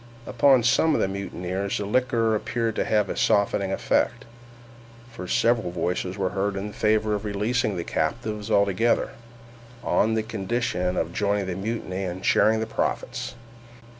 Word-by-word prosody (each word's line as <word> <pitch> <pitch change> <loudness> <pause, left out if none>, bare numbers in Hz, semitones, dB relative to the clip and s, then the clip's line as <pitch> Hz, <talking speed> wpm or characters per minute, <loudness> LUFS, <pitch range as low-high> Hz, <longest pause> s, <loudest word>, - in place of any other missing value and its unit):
Upon 130 0 +4
some 150 +7 +3
of - - +1
the - - +2
mutineers 95 0 -3
the 100 - -3
liquor 115 0 +1
appeared 115 +1 -1
to - - +1
have 105 -2 +2
a - - -4
softening 100 -1 +2
effect, - - 0 0.9
for 90 -6 -8
several 115 -1 +2
voices 90 +2 -2
were 95 -2 -1
heard 100 0 -1
in 100 +2 -4
favor 110 0 +1
of 105 0 -2
releasing 105 +1 0
the 85 - -2
captives 105 +7 -2
altogether, 100 +3 +2 0.7
on 110 +1 +2
condition 100 -4 -2
of - - -1
joining 100 -1 0
the 95 - -3
mutiny 95 -2 -3
and 95 0 -5
sharing 110 +1 +4
the - - -1
profits. 110 - -3
105 Hz, 150 wpm, -25 LUFS, 95-115 Hz, 0.9 s, Upon